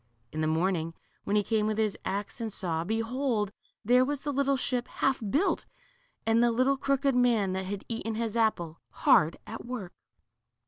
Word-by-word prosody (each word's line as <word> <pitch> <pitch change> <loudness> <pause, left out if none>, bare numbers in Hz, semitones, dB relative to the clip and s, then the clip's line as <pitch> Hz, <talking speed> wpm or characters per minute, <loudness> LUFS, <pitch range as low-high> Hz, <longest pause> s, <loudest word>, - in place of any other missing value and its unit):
In 155 - -3
the 155 - +1
morning, 165 0 0 0.3
when 205 - 0
he 210 - +3
came 215 0 +1
with 215 0 -1
his 215 -2 +1
axe 200 +5 -3
and 225 -1 -3
saw, 165 -4 -2
behold, 225 +1 -1 0.3
there 250 +3 +5
was 285 +1 -2
the 290 - -2
little 275 0 +2
ship 250 -1 -1
half 270 -2 0
built, 305 - +1 0.6
and 225 +1 +4
the 240 - +5
little 255 +4 +3
crooked 275 0 +1
man 235 -6 +3
that 190 0 -2
had 200 0 -5
eaten 225 -1 -3
his 225 -1 -2
apple, 175 -8 0
hard 155 +1 +4
at 225 - -7
work 235 -7 -6
225 Hz, 180 wpm, -29 LUFS, 195-250 Hz, 0.6 s, there